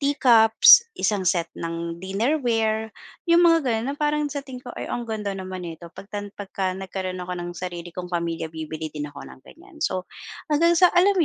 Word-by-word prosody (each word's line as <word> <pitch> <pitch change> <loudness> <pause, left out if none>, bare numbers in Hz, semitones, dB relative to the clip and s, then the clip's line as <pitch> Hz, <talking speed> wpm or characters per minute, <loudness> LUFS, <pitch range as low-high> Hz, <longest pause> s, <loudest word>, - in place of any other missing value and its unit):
tea 285 0 0
cups, 225 - +8 0.2
isang 200 -3 0
set 170 -2 0
ng 170 0 -4
dinnerware, 220 0 0 0.4
'yung 340 +1 +6
mga 330 -4 +4
gano'n 225 +2 -1
na - - -17
parang 300 0 +1
sa 285 - -3
tingin 255 -2 -10
ko, 245 - -7
"Ay - - -5
ang 240 - -3
ganda 210 -2 -3
naman 185 -1 -6
nito, 165 +1 -9
pagtan 205 0 -7
pagka 190 -2 -3
nagkaroon 185 -1 -5
ako 180 - -5
ng 175 0 -5
sarili 175 -1 -6
kong 180 0 -6
pamilya 170 -1 -2
bibili 160 0 -6
din 150 -1 -4
ako 140 - -11
ng - - -14
ganiyan." 355 +1 -17
So 185 -1 -2 0.4
hanggang 335 +3 +4
sa 360 - +7
alam 370 +3 +4
mo - - +5
205 Hz, 200 wpm, -24 LUFS, 175-270 Hz, 0.4 s, cups